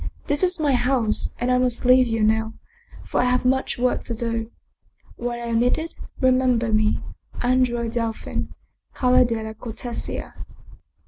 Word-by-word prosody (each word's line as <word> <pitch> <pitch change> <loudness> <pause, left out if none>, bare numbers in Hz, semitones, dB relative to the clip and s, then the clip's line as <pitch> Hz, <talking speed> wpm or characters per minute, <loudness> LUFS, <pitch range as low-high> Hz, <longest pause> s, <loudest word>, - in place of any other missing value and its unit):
This 290 0 +1
is 365 -2 +3
my 295 -3 +2
house, 245 -3 +1
and 245 +1 0
I 250 - +3
must 250 -1 0
leave 255 0 +6
you 225 -1 0
now, 220 +1 +1 0.5
for - - -1
I - - +3
have 250 0 +1
much 265 +1 +1
work 250 0 0
to 235 - -4
do. 230 -1 -2 0.7
When 240 0 -3
I 240 - -7
am 230 -1 +1
needed, 285 +7 0 0.3
remember 255 -3 +2
me: 215 0 +1 0.4
Andrea 245 -2 +2
Delfin, 230 -1 -3 0.5
Calle 255 0 +4
della 220 -2 -3
Cortesia." 235 +2 -5
245 Hz, 150 wpm, -23 LUFS, 230-255 Hz, 0.7 s, leave